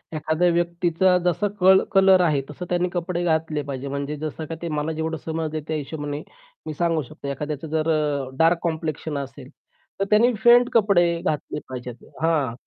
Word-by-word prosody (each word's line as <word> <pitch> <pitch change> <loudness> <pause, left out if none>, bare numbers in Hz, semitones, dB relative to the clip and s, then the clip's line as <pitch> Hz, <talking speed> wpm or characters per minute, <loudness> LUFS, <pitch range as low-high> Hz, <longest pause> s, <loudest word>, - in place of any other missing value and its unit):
एखाद्या 160 +3 +1
व्यक्तीचा 175 +1 +2
जसा 180 +4 +1
क 190 +1 +7 0.2
कलर 190 -1 +6
आहे, 150 -5 +2
तसं 165 +5 -7
त्यांनी 180 0 +1
कपडे 175 0 -2
घातले 160 -2 0
पाहिजे. 140 -1 -5
म्हणजे 140 +2 -3
जसं 155 +1 -5
का 165 +1 -6
ते 170 - -3
मला 150 +2 -1
जेवढं 160 +1 -3
समज 160 -1 -3
आहे, 155 - -2
त्या 155 - -2
हिशोबाने 145 0 -5 0.4
मी 155 - -4
सांगू 165 0 0
शकतो. 145 +1 -10
एखाद्याचं 150 +2 -4
जर 155 +1 -1
अ, 145 -4 0
डार्क 165 +2 +5
कॉम्प्लेक्शन 160 -2 -3
असेल, 135 -1 -7 0.5
तर 195 - +1
त्यांनी 235 +4 +4
फेंट 240 +1 +6
कपडे 200 -6 +4 0.2
घातले 150 -1 -2
पाहिजेत. 125 -2 -6 0.3
हां, 155 -7 +1
160 Hz, 175 wpm, -23 LUFS, 150-175 Hz, 0.5 s, क